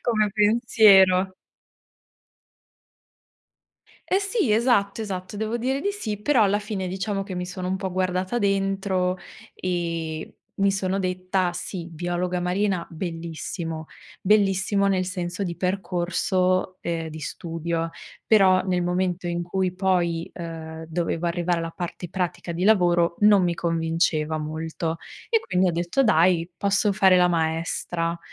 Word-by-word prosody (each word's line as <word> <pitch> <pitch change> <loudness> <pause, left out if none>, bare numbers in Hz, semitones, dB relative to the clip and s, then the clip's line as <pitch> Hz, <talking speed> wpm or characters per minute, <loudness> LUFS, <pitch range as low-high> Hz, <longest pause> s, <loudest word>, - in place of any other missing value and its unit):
come 215 -3 +1
pensiero. 205 -4 +5 2.7
Eh 380 - +3
sì, 400 - 0
esatto, 220 -3 +2
esatto. 190 -2 -5
Devo 220 +2 -2
dire 260 +3 -1
di 405 - 0
sì, 215 - -4
però 250 -1 +3
alla 205 0 +3
fine 205 -3 -4
diciamo 195 +2 -2
che 195 -2 -7
mi 180 0 -3
sono 185 0 -5
un 190 - 0
po' 190 -1 -4
guardata 185 +3 -1
dentro 195 -2 0 0.4
e 165 -3 -3 0.2
mi 195 0 +3
sono 190 0 -1
detta: 185 -1 -1
"Sì, 175 -1 -6
biologa 175 +2 -2
marina, 185 0 0
bellissimo." 165 -1 -5 0.3
Bellissimo 200 0 +2
nel 185 -1 +1
senso 180 +1 -3
di 170 -2 -4
percorso, 185 0 0
ehm, 165 -1 -2
di 155 0 -8
studio, 165 +1 -3 0.4
però 190 -4 +5
nel 180 -2 0
momento 180 0 -1
in 175 0 -2
cui, 185 +2 -1
uhm, 180 - -7
poi 175 -3 0 0.6
dovevo 170 0 -2
arrivare 175 0 0
alla 165 0 -3
parte 175 0 -6
pratica 180 -2 -3
di 170 +2 -2
lavoro 175 -5 +4
non 205 -2 +6
mi 175 -1 +1
convinceva 165 -2 0
molto. 160 +1 -3 0.3
E 455 -2 +4
quindi 185 0 +1
ho - - +2
detto: 175 +10 +1
"Dai, 175 -5 +3
posso 200 +2 +1
fare 190 -2 +5
la 180 0 +5
maestra." 165 +1 -1
185 Hz, 135 wpm, -24 LUFS, 170-195 Hz, 2.7 s, non